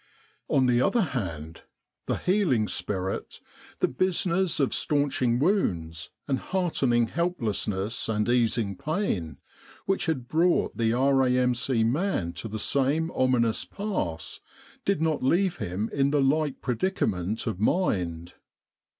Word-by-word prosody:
On 130 Hz, -, +3 dB
the 125 Hz, -1 st, +3 dB
other 235 Hz, -, +3 dB
hand, 80 Hz, -, -5 dB, 0.5 s
the -, -, 0 dB
healing 180 Hz, -, +1 dB
spirit 95 Hz, -1 st, -3 dB, 0.4 s
the -, -, +4 dB
business 180 Hz, +3 st, 0 dB
of 135 Hz, -, +1 dB
staunching 140 Hz, -5 st, +1 dB
wounds, 85 Hz, -, 0 dB, 0.2 s
and 135 Hz, -2 st, 0 dB
heartening 140 Hz, -11 st, +1 dB
helplessness 110 Hz, -, -2 dB
and 105 Hz, -1 st, 0 dB
easing 115 Hz, -4 st, +1 dB
pain 100 Hz, -, -2 dB, 0.5 s
which 195 Hz, -1 st, 0 dB
had 130 Hz, -7 st, -1 dB
brought 170 Hz, +4 st, +2 dB
the 115 Hz, -1 st, +1 dB
R.A.M.C. 125 Hz, -1 st, +2 dB
man 120 Hz, -, 0 dB
to 85 Hz, +6 st, -5 dB
the 110 Hz, 0 st, -5 dB
same 140 Hz, +8 st, +1 dB
ominous 125 Hz, -3 st, +2 dB
pass, 95 Hz, -, -4 dB, 0.5 s
did 195 Hz, -5 st, +1 dB
not 160 Hz, -2 st, 0 dB
leave 175 Hz, +6 st, +2 dB
him 95 Hz, +5 st, -3 dB
in 140 Hz, 0 st, +2 dB
the 145 Hz, 0 st, +2 dB
like 145 Hz, +1 st, +1 dB
predicament 115 Hz, -, -1 dB
of 110 Hz, -6 st, -3 dB
mind. 90 Hz, -, 0 dB
125 Hz, 125 wpm, -27 LUFS, 105-160 Hz, 0.5 s, the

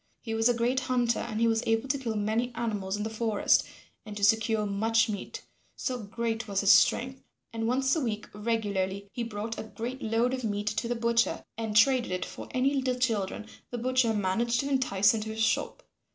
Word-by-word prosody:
He 225 Hz, -, -5 dB
was 225 Hz, +2 st, +3 dB
a 245 Hz, -, +2 dB
great 240 Hz, +3 st, +1 dB
hunter 245 Hz, -2 st, +1 dB
and 220 Hz, -2 st, -4 dB
he 230 Hz, -, +3 dB
was 225 Hz, -1 st, +2 dB
able 225 Hz, +3 st, +1 dB
to 280 Hz, -, +1 dB
kill 230 Hz, -4 st, -3 dB
many 220 Hz, +4 st, 0 dB
animals 205 Hz, -4 st, -2 dB
in 210 Hz, -, -3 dB
the 220 Hz, -, -2 dB
forest 220 Hz, -2 st, +2 dB, 0.4 s
and 210 Hz, -1 st, -8 dB
to 200 Hz, -, -5 dB
secure 220 Hz, 0 st, +3 dB
much 225 Hz, +3 st, +2 dB
meat, 205 Hz, -2 st, -5 dB, 0.3 s
so 255 Hz, -2 st, -3 dB
great 225 Hz, +1 st, -3 dB
was 200 Hz, -1 st, 0 dB
his 200 Hz, 0 st, +5 dB
strength, 260 Hz, +5 st, +3 dB, 0.3 s
and 225 Hz, 0 st, -2 dB
once 265 Hz, +3 st, +2 dB
a -, -, +1 dB
week 215 Hz, -4 st, -3 dB
regularly 200 Hz, -3 st, -2 dB
he 240 Hz, -, -4 dB
brought 225 Hz, 0 st, -4 dB
a -, -, -4 dB
great 240 Hz, +4 st, -6 dB
load 230 Hz, +3 st, +1 dB
of 255 Hz, -1 st, -3 dB
meat 205 Hz, -2 st, -2 dB
to 215 Hz, +2 st, -2 dB
the 240 Hz, -, -1 dB
butcher 235 Hz, 0 st, +1 dB
and 220 Hz, -2 st, -1 dB
traded 250 Hz, -1 st, +4 dB
it 180 Hz, 0 st, -2 dB
for -, -, -9 dB
any 260 Hz, +2 st, +1 dB
little 260 Hz, -2 st, 0 dB
children 220 Hz, -4 st, -1 dB, 0.2 s
the 245 Hz, -, -4 dB
butcher 255 Hz, -1 st, +2 dB
managed 220 Hz, +4 st, +1 dB
to 280 Hz, -, -3 dB
entice 220 Hz, -7 st, +3 dB
into 220 Hz, -1 st, -3 dB
his 220 Hz, 0 st, -1 dB
shop. -, -, 0 dB
225 Hz, 210 wpm, -28 LUFS, 210-245 Hz, 0.4 s, his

